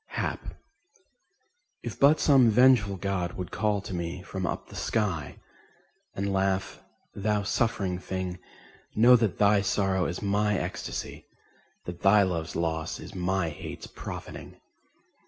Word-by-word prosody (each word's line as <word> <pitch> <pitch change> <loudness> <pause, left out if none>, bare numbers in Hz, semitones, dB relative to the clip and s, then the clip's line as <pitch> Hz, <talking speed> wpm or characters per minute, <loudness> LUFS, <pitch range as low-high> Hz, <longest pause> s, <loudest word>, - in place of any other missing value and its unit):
Hap - - -3 1.3
If - - -6
but 145 +3 +6
some 135 -5 +5
vengeful 115 -3 +5
god 90 -2 -2
would 90 -2 -6
call 105 -2 0
to 95 - -7
me 85 +1 -4
From 95 -1 -4
up - - -4
the - - -12
sky, 95 -8 -2 0.8
and 100 0 -1
laugh: 95 0 0 0.3
"Thou 105 0 0
suffering 100 -4 0
thing, 95 -1 -4 0.6
Know 120 +3 +7
that 115 -5 +1
thy 100 0 +4
sorrow 95 -2 +1
is 85 - -4
my 105 0 +1
ecstasy, - - -5 0.6
That 90 -1 -7
thy 100 +1 +6
love's 85 -3 -2
loss 80 -1 -2
is - - -10
my 95 -1 0
hate's 75 - -8
profiting!" - - -8
95 Hz, 135 wpm, -27 LUFS, 90-105 Hz, 1.3 s, Know